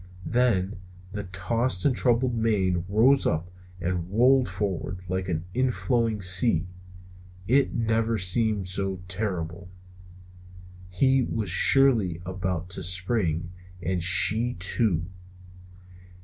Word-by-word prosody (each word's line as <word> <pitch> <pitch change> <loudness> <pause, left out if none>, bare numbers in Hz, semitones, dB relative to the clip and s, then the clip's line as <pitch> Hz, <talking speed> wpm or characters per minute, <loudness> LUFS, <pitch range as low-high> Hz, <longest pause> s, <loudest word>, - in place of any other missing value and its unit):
Then 110 -5 0 0.3
the 105 +1 -5
tossed 95 +3 -2
and 135 - +3
troubled 125 0 +1
mane 95 -6 0
rose 125 +7 +3
up 85 +3 -2 0.3
and 90 0 -3
rolled 125 +4 +3
forward 95 -2 -3
like 95 +1 -3
an 80 -1 -3
inflowing 115 -3 0
sea. 90 -1 +2 0.8
It 135 +3 +2
never 115 0 0
seemed 100 +1 +1
so 95 0 -2
terrible. 90 -2 -4 1.2
He 130 +9 +2
was 110 -6 -3
surely 110 -5 +4
about 90 -2 -4
to 95 - -5
spring! 90 -2 -1 0.3
And 90 +1 -2
she, 110 +7 +4
too! 90 -1 0
95 Hz, 105 wpm, -25 LUFS, 90-115 Hz, 1.2 s, surely